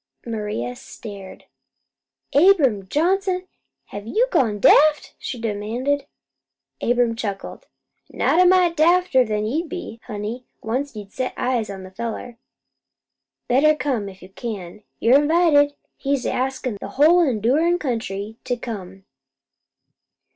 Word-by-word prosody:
Maria 210 Hz, -, -3 dB
stared. 200 Hz, -, -10 dB, 0.9 s
"Abram 280 Hz, -, +4 dB
Johnson, 365 Hz, -, 0 dB, 0.4 s
have 205 Hz, +1 st, -8 dB
you 465 Hz, -, +2 dB
gone 220 Hz, -, +2 dB
daft?" 300 Hz, +8 st, +5 dB
she 245 Hz, -, -5 dB
demanded. 230 Hz, +6 st, -2 dB, 0.7 s
Abram 240 Hz, -1 st, +2 dB
chuckled. 200 Hz, -4 st, -6 dB, 0.4 s
"Not 350 Hz, -, +2 dB
a -, -, +6 dB
mite 360 Hz, -2 st, +4 dB
dafter'n 290 Hz, -11 st, +3 dB
you'll 315 Hz, +9 st, -1 dB
be, 350 Hz, -10 st, -7 dB
honey, 220 Hz, +3 st, -5 dB, 0.2 s
once 255 Hz, +4 st, -2 dB
you 205 Hz, -2 st, -7 dB
set 255 Hz, +5 st, -4 dB
eyes 245 Hz, -4 st, -1 dB
on 190 Hz, -1 st, -7 dB
the 185 Hz, -, -11 dB
fellow. 235 Hz, +3 st, -5 dB, 1.1 s
Better 295 Hz, +5 st, +4 dB
come, 255 Hz, -9 st, -2 dB
if 190 Hz, -1 st, -14 dB
you 185 Hz, -, -12 dB
can. 205 Hz, -2 st, -7 dB, 0.2 s
You're 255 Hz, +5 st, +5 dB
invited. 295 Hz, -2 st, +3 dB, 0.2 s
He's 275 Hz, -2 st, -1 dB
askin' 255 Hz, -4 st, -2 dB
the -, -, -5 dB
whole 325 Hz, +5 st, +6 dB
endurin' 285 Hz, -, +2 dB
country 220 Hz, -, -4 dB
to 245 Hz, -, -1 dB
come." 195 Hz, -5 st, -8 dB
245 Hz, 120 wpm, -22 LUFS, 210-300 Hz, 1.1 s, a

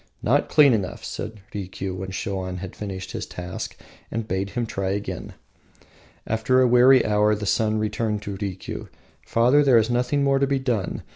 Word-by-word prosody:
"Not -, -, +2 dB
clean 145 Hz, -4 st, +6 dB
enough," 100 Hz, -4 st, -2 dB
said 110 Hz, -1 st, -6 dB
Rikiu, 95 Hz, -1 st, -4 dB
when 95 Hz, +1 st, -5 dB
Shoan 95 Hz, -1 st, -3 dB
had 95 Hz, 0 st, -7 dB
finished 95 Hz, -2 st, -6 dB
his -, -, -5 dB
task, 90 Hz, 0 st, -6 dB, 0.3 s
and 115 Hz, 0 st, -3 dB
bade 95 Hz, 0 st, -2 dB
him 120 Hz, +3 st, -2 dB
try 95 Hz, -3 st, -3 dB
again. 100 Hz, +1 st, -4 dB, 0.9 s
After 115 Hz, +4 st, +2 dB
a 130 Hz, -, +5 dB
weary 125 Hz, +2 st, +6 dB
hour 105 Hz, 0 st, +3 dB
the 105 Hz, 0 st, -5 dB
son 110 Hz, +1 st, +1 dB
turned 105 Hz, -2 st, -2 dB
to 100 Hz, -, -5 dB
Rikiu: 95 Hz, -2 st, -5 dB, 0.4 s
"Father, 125 Hz, +6 st, +4 dB
there 135 Hz, -4 st, +5 dB
is 110 Hz, +1 st, +2 dB
nothing 125 Hz, +4 st, +1 dB
more 135 Hz, -1 st, +3 dB
to 140 Hz, -, +2 dB
be 140 Hz, 0 st, +1 dB
done. 120 Hz, -8 st, -2 dB
105 Hz, 175 wpm, -24 LUFS, 95-125 Hz, 0.9 s, clean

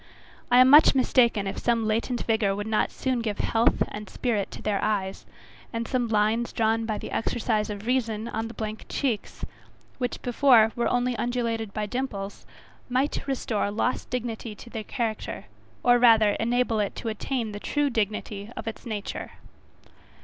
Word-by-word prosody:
I 245 Hz, -, +5 dB
am 255 Hz, -, +7 dB
much 295 Hz, +2 st, +8 dB
mistaken, 240 Hz, -5 st, +3 dB
if 195 Hz, -, -3 dB
some 235 Hz, -2 st, +1 dB
latent 230 Hz, +3 st, -1 dB
vigour 220 Hz, -3 st, +1 dB
would 205 Hz, +1 st, -4 dB
not 220 Hz, -1 st, +1 dB
soon 260 Hz, -2 st, -1 dB
give 215 Hz, -3 st, -2 dB
health 225 Hz, +1 st, +2 dB
and 210 Hz, 0 st, -7 dB
spirit 220 Hz, -6 st, -1 dB
to -, -, -9 dB
their 205 Hz, -2 st, 0 dB
eyes, 195 Hz, -3 st, -2 dB, 0.4 s
and 230 Hz, -1 st, -3 dB
some 250 Hz, -2 st, 0 dB
lines 220 Hz, +2 st, +1 dB
drawn 225 Hz, 0 st, +1 dB
by 215 Hz, -2 st, -1 dB
the -, -, -7 dB
exercise 220 Hz, -2 st, 0 dB
of 205 Hz, 0 st, -6 dB
reason 230 Hz, -3 st, 0 dB
on 225 Hz, 0 st, -3 dB
the 230 Hz, -, -10 dB
blank 215 Hz, 0 st, -5 dB
cheeks, 245 Hz, -7 st, -2 dB, 0.5 s
which 245 Hz, -1 st, -2 dB
before 240 Hz, -3 st, +5 dB
were 240 Hz, -, 0 dB
only 245 Hz, 0 st, +1 dB
undulated 230 Hz, -2 st, -1 dB
by 210 Hz, +1 st, -2 dB
dimples, 205 Hz, -4 st, -5 dB, 0.4 s
might 265 Hz, +3 st, 0 dB
restore 235 Hz, -6 st, -1 dB
lost 220 Hz, +4 st, -1 dB
dignity 230 Hz, -3 st, -4 dB
to 235 Hz, -, -13 dB
the 220 Hz, -, -4 dB
character, 225 Hz, -2 st, -3 dB, 0.4 s
or 245 Hz, 0 st, +5 dB
rather 225 Hz, -3 st, +6 dB
enable 235 Hz, -1 st, +1 dB
it 205 Hz, -2 st, -1 dB
to -, -, -6 dB
attain 225 Hz, +1 st, -3 dB
the 205 Hz, -, -6 dB
true 290 Hz, +5 st, 0 dB
dignity 210 Hz, -2 st, -2 dB
of 225 Hz, -, -6 dB
its 225 Hz, +2 st, -6 dB
nature. 215 Hz, -2 st, -5 dB
225 Hz, 170 wpm, -26 LUFS, 215-245 Hz, 0.5 s, much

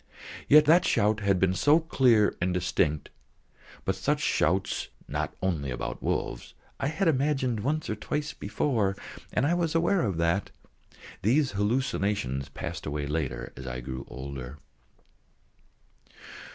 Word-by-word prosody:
Yet 150 Hz, +1 st, +8 dB
that 170 Hz, +4 st, +6 dB
shout 105 Hz, -, +2 dB
had 100 Hz, -3 st, +2 dB
been 95 Hz, 0 st, +3 dB
so 145 Hz, -, +4 dB
clear 125 Hz, -9 st, +3 dB
and 90 Hz, 0 st, +1 dB
distinct, 85 Hz, -4 st, 0 dB, 0.7 s
but -, -, +1 dB
such -, -, 0 dB
shouts 95 Hz, +4 st, +1 dB, 0.2 s
(not -, -, -3 dB
only 80 Hz, -7 st, -1 dB
about 60 Hz, -, -4 dB
wolves) -, -, -3 dB, 0.2 s
I -, -, 0 dB
had 170 Hz, +5 st, 0 dB
imagined 135 Hz, -5 st, +1 dB
once 150 Hz, +8 st, -1 dB
or 110 Hz, -, -2 dB
twice 150 Hz, +7 st, -3 dB
before, 110 Hz, -9 st, 0 dB, 0.4 s
and -, -, +1 dB
I 160 Hz, -, +2 dB
was 170 Hz, -2 st, 0 dB
aware 170 Hz, +3 st, +3 dB
of 100 Hz, -7 st, -1 dB
that. 85 Hz, +4 st, +1 dB, 0.7 s
(These 130 Hz, +7 st, +3 dB
hallucinations 105 Hz, -, -1 dB
passed -, -, -6 dB
away 75 Hz, 0 st, -2 dB
later 70 Hz, -5 st, -3 dB
as 65 Hz, 0 st, -9 dB
I 60 Hz, 0 st, -4 dB
grew 65 Hz, +1 st, -6 dB
older.) 65 Hz, +1 st, -7 dB
105 Hz, 140 wpm, -28 LUFS, -, 0.7 s, Yet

